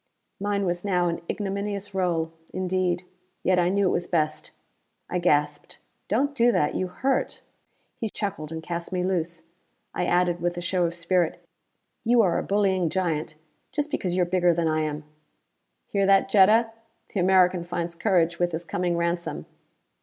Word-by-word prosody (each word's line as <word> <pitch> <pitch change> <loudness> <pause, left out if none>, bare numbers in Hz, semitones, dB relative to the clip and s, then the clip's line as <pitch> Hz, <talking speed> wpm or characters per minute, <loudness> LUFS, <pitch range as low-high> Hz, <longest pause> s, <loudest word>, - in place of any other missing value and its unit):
Mine 200 0 0
was 175 -1 -1
now 180 -3 +1
an 170 - -3
ignominious 200 0 -3
role, 170 -4 0 0.2
indeed, 185 -1 0 0.4
yet 185 -1 +3
I 175 0 +3
knew 200 +1 +2
it - - +2
was 175 - -1
best. 155 -3 -1 0.6
I 180 - 0
gasped. 150 -3 0 0.3
"Don't 275 +8 +1
do 240 -3 +4
that: 150 - +1
you 185 - -1
hurt!" 260 +9 -1 0.6
He 225 - -2
chuckled 175 -8 -4
and 160 0 -5
cast 170 +1 -5
me 180 -1 -1
loose. 170 -3 -2 0.5
I 180 - -1
added, 175 -1 +2
with 175 0 -1
a - - -1
show 175 0 +1
of 170 - -6
spirit, 170 -1 0 0.6
"You 235 0 +4
are 175 -4 +2
a - - -3
bullying 190 -4 +1
giant. 160 -4 -1 0.4
Just 295 0 -2
because 180 -10 -1
you 180 - +3
are - - +1
bigger 175 -1 +2
than 170 -1 +1
I 155 0 +1
am 150 0 -3 0.4
" - - -51
"Hear 195 -1 +2
that, 195 0 +4
Jetta? 215 +4 +5 0.4
The 200 - 0
American 180 -1 +4
finds 170 -1 -3
courage 170 -2 +1
with 175 -1 +1
his 165 +2 -4
coming 175 0 -1
ransom!" 170 -2 -2
180 Hz, 175 wpm, -25 LUFS, 170-195 Hz, 0.6 s, Jetta